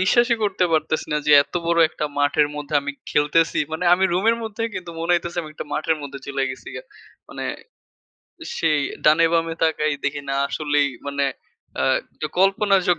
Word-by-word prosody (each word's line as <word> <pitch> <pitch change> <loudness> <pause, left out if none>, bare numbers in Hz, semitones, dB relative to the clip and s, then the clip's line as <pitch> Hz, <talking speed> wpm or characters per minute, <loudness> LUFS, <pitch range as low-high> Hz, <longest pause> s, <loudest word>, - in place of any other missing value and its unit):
বিশ্বাসই 235 +5 +3
করতে 195 -3 +1
পারতেছি 155 0 0
না 150 - +2
যে, - - +3
এত - - -20
বড় 170 0 +2
একটা 155 -1 -5
মাঠের 145 +1 +3
মধ্যে 150 0 -5
আমি 140 0 -4 0.2
খেলতেছি। 150 +3 +2
মানে 160 +3 -2
আমি 190 +2 +1
রুমের 215 +6 +2
মধ্যেই 225 +1 -3
কিন্তু 175 -2 -6
মনে 170 +2 +1
হইতেছে 170 0 -2
আমি 155 - -9
একটা - - -7
মাঠের 160 +1 0
মধ্যে 140 -1 -7
চইলা 140 -1 -2
গেছি 130 - -9
গা। - - -7 0.5
মানে - - -6 1.1
সেই 155 -3 +2 0.2
ডানে 155 +2 +5
বামে 165 -1 +1
তাকায় 155 -2 +1
দেখি 145 0 -1
না 135 - -1
আসলেই 145 -1 +1 0.2
মানে 140 0 -1 0.6
আ - - +2 0.4
যে - - -1
কল্পনার 195 +1 +3
জগ 175 -2 +3
160 Hz, 180 wpm, -22 LUFS, 150-180 Hz, 1.1 s, ডানে